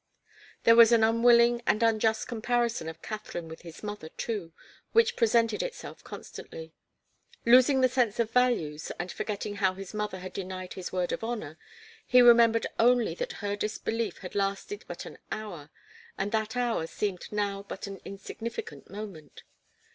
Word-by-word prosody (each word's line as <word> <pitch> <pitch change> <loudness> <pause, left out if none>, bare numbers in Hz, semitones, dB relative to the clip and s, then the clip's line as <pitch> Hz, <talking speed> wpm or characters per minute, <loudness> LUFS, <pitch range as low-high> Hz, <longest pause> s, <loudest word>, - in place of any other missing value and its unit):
There 230 - +7
was 230 0 +8
an 230 -2 +5
unwilling 235 +1 +5
and 215 - +3
unjust 220 -1 +2
comparison 235 -5 -1
of 160 0 -11
Katharine 210 -6 -6
with 160 0 -10
his 170 +2 -11
mother, 205 -6 -6
too, 200 -6 -4 0.4
which 460 +1 +4
presented 230 -1 +2
itself - - -7
constantly. 485 0 -9 0.7
Losing 255 +3 +6
the 255 - +6
sense 245 -4 0
of 230 -1 +1
values 200 -13 +1
and 175 0 -4
forgetting 205 -1 -4
how 190 -2 +2
his 195 +1 -8
mother 210 -2 -3
had 185 0 -8
denied 185 -1 -6
his 185 -2 -6
word 180 -1 -1
of - - -3
honour, 220 -9 -4 0.4
he 250 - +5
remembered 235 -2 +6
only 240 0 +4
that - - -4
her 200 0 0
disbelief 215 0 -2
had 185 - -8
lasted 200 - -2
but - - -7
an - - -10
hour, 175 -9 -6 0.5
and 200 +1 -2
that 220 +1 -1
hour 235 -9 0
seemed 195 0 -4
now 200 -1 -1
but 200 - -7
an 195 -1 -8
insignificant 230 - -7
moment. 195 -8 -9
215 Hz, 160 wpm, -28 LUFS, 195-235 Hz, 0.7 s, was